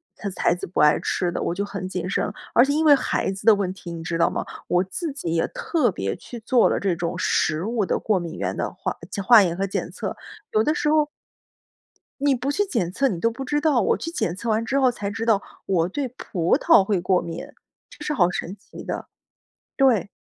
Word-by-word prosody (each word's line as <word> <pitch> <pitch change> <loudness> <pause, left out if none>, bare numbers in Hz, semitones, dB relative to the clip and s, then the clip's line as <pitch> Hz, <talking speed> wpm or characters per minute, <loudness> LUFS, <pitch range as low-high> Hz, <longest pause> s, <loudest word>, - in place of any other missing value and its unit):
他 200 - -5
孩 - - +3
子 180 - -6
不 180 - -3
爱 150 0 +6
吃 180 - -1
的， - - -3
我 - - -1
就 200 +2 -1
很 195 -2 -5
谨 180 -1 -3
慎。 210 - -1 0.2
而 240 - +6
且 280 - 0
因 315 +2 +1
为 295 -2 +8
孩 - - -1
子 195 - -8
的 225 - +8
问 190 -2 -2
题， 185 -2 -9
你 165 - -6
知 165 0 -2
道 170 - +3
吗， - - -3 0.2
我 180 0 +3
自 305 - -4
己 170 - -3
也 165 - +2
特 295 -10 0
别 95 - -3
去 240 - -10
做 235 +2 +3
了 - - 0
这 190 -3 0
种 170 0 -3
食 155 +3 +1
物 225 -2 0
的 - - 0
过 210 -3 +1
敏 170 -1 -6
原 - - -2
的 - - -2
化 - - -4 0.2
检 200 - -3
化 225 +1 +8
验 170 -2 -1
和 195 +1 -1
检 195 - -3
测， - - -5 0.4
有 215 - +4
的 305 - +2
时 300 - -1
候 305 -1 +3 1.1
你 285 -1 +3
不 255 +2 -2
去 355 +8 +1
检 230 - -1
测 275 +8 +1
你 180 -7 -3
都 230 - +2
不 240 +4 -6
知 295 +3 0
道。 295 -5 +3
我 - - +2
去 330 - -5
检 180 - -2
测 230 +5 -4
完 220 +1 +1
之 270 +4 +1
后 260 -2 +5
才 205 -4 -4
知 225 +2 -4
道， 220 -4 +3 0.2
我 175 -2 +1
对 275 +7 -2
葡 180 -8 0
萄 - - +5
会 195 -1 0
过 180 0 +2
敏。 170 +10 -6 0.4
这 - - -11
是 300 - -1
好 180 -11 +3
神 180 +1 -4
奇 205 - -12
的， - - -5 0.7
对。 255 -8 +3
205 Hz, 260 characters per minute, -23 LUFS, 180-260 Hz, 1.1 s, 为